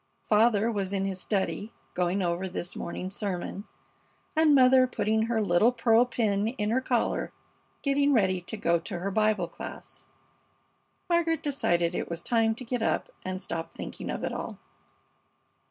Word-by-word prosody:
Father 220 +1 +3
was 200 -3 -2
in 195 -1 0
his 190 -1 -3
study, 205 +1 -2 0.2
going 180 +2 0
over 175 +1 -1
his 175 -1 -4
morning 185 +2 -5
sermon, 200 0 -4 0.7
and 310 -2 +5
mother 255 -1 +6
putting 220 -1 0
her 225 -2 +1
little 200 +5 +4
pearl 230 -1 +4
pin 215 -4 0
in 220 -3 -2
her 255 +3 +2
collar, 245 -3 0 0.5
getting 280 0 +3
ready 190 -7 +2
to 195 +5 -7
go 170 -4 +2
to 175 +2 -6
her 190 +3 -3
Bible 215 -3 +2
class. - - -10 1.0
Margaret 335 -2 +1
decided 175 - +1
it - - -3
was 170 0 -5
time 225 -2 +2
to 255 - -8
get 245 0 -2
up - - 0
and 185 0 -3
stop 165 -1 -4
thinking - - -6
of - - -3
it - - -2
all. - - -5
215 Hz, 160 wpm, -28 LUFS, 185-240 Hz, 1.0 s, mother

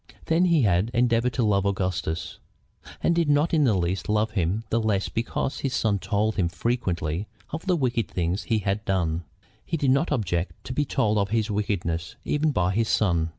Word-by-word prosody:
Then 165 +3 +3
he 170 -6 +3
had 100 +1 +2
endeavored 120 0 +2
to 125 - 0
love 100 -3 +2
Augustus, 95 -4 -2 0.6
and 170 - +3
did 170 -3 +1
not 145 +3 +3
in 155 -3 +4
the 110 -5 +3
least 90 +2 -1
love 105 +1 +1
him 95 +2 0
the 115 - +2
less 105 -3 0
because 115 +4 -2
his 135 -2 -2
son 105 -3 +1
told 105 +2 0
him 90 -4 +2
frequently 90 -4 -2 0.2
of 160 +5 -5
the 180 - +3
wicked 125 -7 0
things 90 +3 -1
he 115 - +1
had 100 +1 -1
done. 85 -4 -1 0.4
He 165 - -2
did 140 -3 +2
not 140 +5 +2
object 90 - -1
to 130 - -5
be 145 +3 +1
told 105 -5 +1
of 100 0 0
his 110 0 0
wickedness 90 -5 -2
even 150 +1 +1
by 90 -8 +1
his 110 +3 0
son. 85 -6 +2
105 Hz, 195 wpm, -25 LUFS, 95-125 Hz, 0.6 s, in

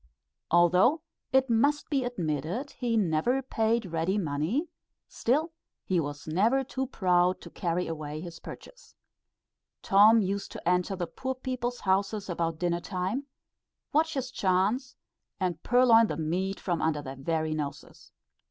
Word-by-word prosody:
Although 180 - +4 0.3
it 265 0 +4
must 280 +6 +2
be 275 -3 +2
admitted 175 - -3
he 235 -2 -1
never 210 +8 +1
paid 225 -2 0
ready 170 +3 -1
money, 170 - -1 0.4
still 300 +8 0 0.3
he 185 -2 +1
was 145 -1 -5
never 220 +12 +2
too 265 0 -3
proud 180 -5 +2
to - - -11
carry 175 0 -1
away 155 -2 -5
his 170 0 -8
purchase. - - -12 0.9
Tom 210 +3 +6
used 200 0 -2
to - - -8
enter 180 +2 +1
the 175 -2 -2
poor 260 +9 -4
people's 250 -1 -4
houses 195 +1 0
about 165 -1 -2
dinner 175 0 -1
time, 190 +10 -3 0.7
watch 320 +1 +2
his 260 -2 -3
chance, 205 +7 0 0.4
and 180 -4 -2
purloin 240 -2 +5
the 150 - -4
meat 180 +5 -2
from 175 -4 -2
under 155 -2 0
their 135 -1 -7
very 155 +3 -1
noses. 145 -1 -6
190 Hz, 145 wpm, -28 LUFS, 165-245 Hz, 0.9 s, Tom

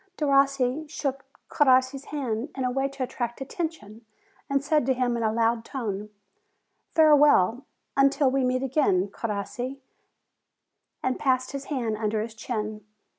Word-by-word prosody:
Derossi 275 0 +2
shook 275 -3 -3 0.2
Crossi's 260 0 +3
hand, 260 -3 -3
in 265 - -3
a 250 - 0
way 270 +2 0
to 275 -1 -5
attract 240 -2 -4
attention, 270 - -5 0.5
and 275 0 +1
said 300 0 +2
to 265 - +3
him 245 -1 0
in 235 - -2
a 220 -1 +1
loud 230 0 +1
tone, 210 -6 -4 0.9
"Fare 310 -2 +7
well 265 -5 +4 0.3
until 275 0 +3
we 270 0 +1
meet 255 +1 0
again, 245 -9 +2
Crossi," 230 +6 -4 1.2
and 260 0 -1
passed 255 -2 +1
his 275 0 -5
hand 235 -7 -2
under 215 0 -1
his 220 +1 -4
chin. 215 -2 -4
255 Hz, 145 wpm, -26 LUFS, 230-275 Hz, 1.2 s, Fare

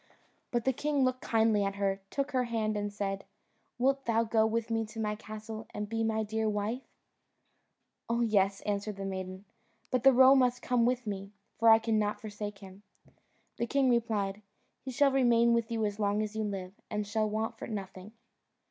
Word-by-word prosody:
But 240 -2 -1
the 265 - +3
king 285 +1 0
looked 255 0 -1
kindly 220 -2 +2
at 195 0 -2
her, 195 -1 -1
took 280 +1 -2
her 255 -2 +1
hand 220 -2 -1
and 205 0 -2
said, 195 -1 -3 0.5
"Wilt 270 +2 +1
thou 230 0 +2
go 220 -1 +2
with 230 +1 -2
me 225 0 +1
to 220 +1 -9
my 210 -1 0
castle, 215 +1 -8
and 210 0 -3
be 225 +1 -1
my 220 0 0
dear 220 +1 -1
wife?" 210 +4 -2 1.3
"Oh 235 +1 +1
yes," 200 -4 +2
answered 205 0 -2
the 195 0 -5
maiden, 190 0 -5 0.5
"but 255 - +1
the 270 +2 +7
roe 260 +1 +7
must 250 -2 +2
come 240 -1 +2
with 250 0 0
me, 195 -1 -5 0.3
for 230 0 +6
I 225 - +9
cannot 215 -2 0
forsake 210 -1 -6
him." 195 0 -13 0.8
The 235 - -1
king 270 0 +3
replied, 210 -4 0 0.4
"He 265 - -6
shall 275 +2 +3
remain 235 -3 +4
with 235 -1 +1
you 225 -2 0
as 205 0 -3
long 205 0 +1
as 215 0 -5
you 220 0 -1
live, 190 -2 -5 0.2
and 210 0 -2
shall 215 +1 0
want 220 +1 -3
for - - -6
nothing." 195 -1 -7
220 Hz, 195 wpm, -31 LUFS, 205-235 Hz, 1.3 s, I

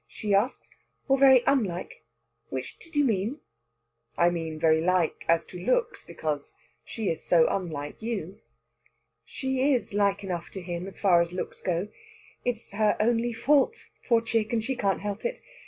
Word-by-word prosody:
she 210 -2 -3
asks 210 +7 0 0.4
"or 270 - +5
very 265 -2 +6
unlike? 205 -11 0 0.5
Which 130 -1 -6
did 330 -1 -14
you 290 -1 +4
mean?" 225 +4 0 0.8
"I 175 +1 +4
mean 165 -2 -4
very 160 0 +4
like 180 -1 +1
as 165 0 +3
to 180 - -9
looks. 480 - 0
Because 150 -2 -4 0.3
she 220 -4 -3
is 165 - -2
so 165 -2 +5
unlike 155 -5 -4
you." 200 -6 -4 0.9
"She 265 - 0
is 240 - -3
like 200 0 +1
enough 175 -3 -4
to 190 - -6
him, 175 +1 -5
as 195 - -11
far 180 -4 +5
as 170 +1 -2
looks 185 - -5
go. 180 +3 -1 0.5
It's 240 -2 -3
her 210 +1 +2
only 235 +2 +2
fault, 285 - +2 0.2
poor 235 -2 +4
chick, 225 -1 -1
and 230 -2 0
she 265 +3 -2
can't 195 -5 0
help 205 0 -4
it. 485 +1 -2
200 Hz, 170 wpm, -27 LUFS, 175-240 Hz, 0.9 s, very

